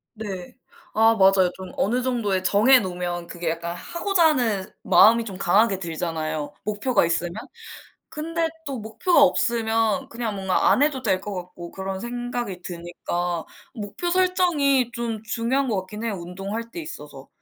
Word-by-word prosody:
네. 195 -5 -7 0.4
아 225 +1 +5
맞아요. 190 -2 +5
좀 190 0 -9
어느 245 +5 +1
정도의 210 -7 0
정해 225 +8 +5
놓으면 175 -3 -4
그게 170 -1 -4
약간 170 +1 -3
하고자 340 - +1
하는 225 -10 0
마음이 225 +6 +6
좀 195 -4 -7
강하게 200 +2 +3
들잖아요 160 -3 -3
목표가 215 +3 +1
있으면. 170 +1 -1 0.8
근데 330 +2 -2 0.2
또 275 -5 -4
목표가 250 - +2
없으면 225 +1 +1
그냥 230 -3 -4
뭔가 190 -1 +2
안 - - +4
해도 290 -3 +1
될 190 -5 +1
것 205 -1 -6
같고 175 -1 -8
그런 190 0 -4
생각이 240 -5 -4
드니까 175 0 -4 0.3
목표 215 - -4
설정이 340 -9 +2
좀 230 -3 -4
중요한 245 +4 0
것 215 - 0
같긴 210 +4 -8
해요 225 - -1
운동할 195 +6 -6
때 340 - -6
있어서. 145 - -9
210 Hz, 315 characters per minute, -24 LUFS, 180-245 Hz, 0.8 s, 마음이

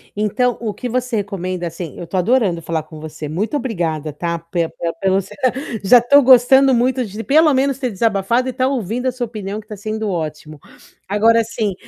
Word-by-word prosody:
Então, 235 +4 0
o 220 -3 -3
que 250 - -5
você 250 -1 -1
recomenda, 185 -3 -3
assim. 165 -1 -6
Eu 175 - -6
tô 170 +3 -4
adorando 185 -3 +1
falar 160 -1 -3
com 155 0 -12
você, 155 0 -7
muito 200 - -2
obrigada, 165 - -3
tá. 170 +3 -3
Pela 170 0 -3
pela 170 -1 -3
pelo, 190 +3 0 0.7
já 225 +6 +7
estou 280 +5 +5
gostando 265 +1 +6
muito 255 +2 +1
de 210 +2 -7
pelo 310 +4 +4
menos, 270 0 +1
ter 255 -2 -1
desabafado 225 +3 0
e - - -1
estar 255 0 0
ouvindo 250 -1 -2
a 255 - +2
sua 245 0 -3
opinião, 210 -2 -6
que 210 - -14
tá 215 - -7
sendo 215 +1 -4
ótimo. 155 -3 -5 0.5
Agora, 225 +3 +4
assim, 220 -2 -2
215 Hz, 195 wpm, -18 LUFS, 175-250 Hz, 0.7 s, já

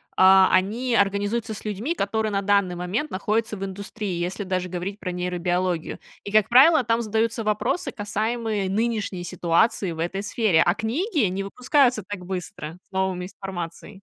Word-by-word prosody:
а, 190 0 +7
они 225 +6 +1
организуются 205 +3 0
с - - -10
людьми, 215 - -2
которые 215 -1 -1
на 195 - 0
данный 200 -3 +2
момент 185 - -2
находятся 215 +3 -1
в 195 - -5
индустрии, 200 -1 -5
если 185 +4 -3
даже 185 -1 -2
говорить 185 +3 -5
про 180 - -4
нейробиологию. 180 -1 -1 0.3
И, 200 - -6
как 215 -1 +4
правило, 270 +4 +7
там 230 0 +1
задаются 225 +1 0
вопросы, 215 - -1
касаемые 215 -1 -2
нынешней 210 -3 -1
ситуации 175 +2 +1
в 160 - -7
этой 175 +4 -2
сфере. 205 -4 +2
А 175 +3 +3
книги 285 - 0
не 190 +2 -3
выпускаются 250 +1 +2
так 185 -3 -6
быстро 180 -3 -6
с - - -60
новыми 190 -1 -1
информацией. 190 +1 -7
200 Hz, 160 wpm, -24 LUFS, 185-225 Hz, 0.3 s, а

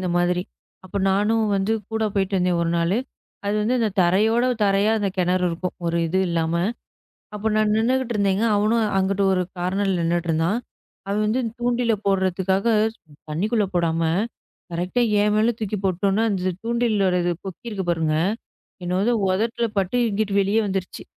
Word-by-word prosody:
இந்த 185 - -2
மாதிரி. 180 0 +1 0.4
அப்போ 195 +2 -4
நானும் 215 +3 +2
வந்து 195 +3 0 0.2
கூடப் 220 -2 -1
போயிட்டு 195 0 0
வந்தேன் 180 -1 +1
ஒரு 165 - 0
நாளு. 170 +6 +1 0.5
அது 205 - 0
வந்து 245 +4 +1
இந்தத் 210 -4 -1
தரையோடு 220 +7 +3 0.2
தரையா 200 +2 +3
அந்தக் 195 -1 -2
கிணறு 180 0 +2
இருக்கும். 175 +2 -4
ஒரு 170 0 0
இது 185 +4 0
இல்லாம. 165 -1 0 0.8
அப்ப 215 +2 -1
நான் 215 0 +2
நின்னுகிட்டு 250 +2 +1
இருந்தேங்க 200 +1 +1
அவனும் 220 +2 +2
அங்கிட்டு 195 +1 +1
ஒரு 185 - +1 0.2
கார்னர் 190 +3 -1
ல 180 - 0
நின்னுகிட்டு 170 0 0
இருந்தான். 165 +7 +1 0.5
அவன் 210 +2 0
வந்து 220 +5 +1 0.2
தூண்டில 240 -1 +1
போடறதுக்காக 190 +1 +1 0.6
தண்ணிக்குள்ள 205 +7 0
போடாம 165 -1 +1 0.7
கரெக்ட்டா 180 +8 -1 0.2
ஏன் 210 0 +2
மேல 225 +2 +3
தூக்கி 210 -1 -2
போட்டோன்ன 195 +4 +1
அந்தத் 185 -2 -2
தூண்டிலோட 225 -5 +1
இது 175 - +1
கொக்கி 190 +5 -7
இருக்கு 195 -4 -4
பாருங்க. 160 -2 0 0.7
என்னோட 185 +6 +1 0.2
உதட்டுல 225 +4 0
பட்டு 195 +5 +1
இங்கிட்டு 205 0 -1
வெளியே 200 +3 +2
வந்துருச்சு. 190 -1 -4
195 Hz, 155 wpm, -23 LUFS, 180-220 Hz, 0.8 s, தரையோடு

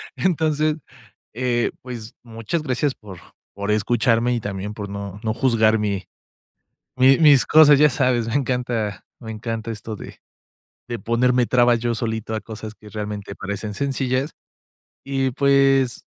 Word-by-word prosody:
Entonces 155 -3 +1 0.6
eh, 120 -1 0
pues, 120 -3 -8
muchas 115 +7 -4
gracias 135 0 0
por, 95 -5 -12 0.4
por 100 +1 -2
escucharme 115 +2 +2
y - - -1
también 105 0 -5
por 105 -2 -6
no 100 0 -6
no 110 -1 0
juzgar 110 -3 +2
mi 100 -3 -2 0.9
mi 130 +1 +5
mis 145 -5 +6
cosas, 150 -2 +7
ya 150 +1 +5
sabes, 125 -3 +1
me 115 - -3
encanta 125 -6 -1 0.2
me 110 -3 -7
encanta 115 +1 -5
esto 110 0 -7
de, - - -11 0.7
de 120 -1 -4
ponerme 125 +1 +2
trabas 120 -1 +3
yo 120 0 -1
solito 110 -1 -3
a 110 - -3
cosas 110 -1 -8
que 105 - -15
realmente 105 -2 -6
parecen 100 +1 -5
sencillas 135 +1 -1 0.7
y 135 -1 0
pues, 135 -1 +2
120 Hz, 145 wpm, -22 LUFS, 110-130 Hz, 0.9 s, cosas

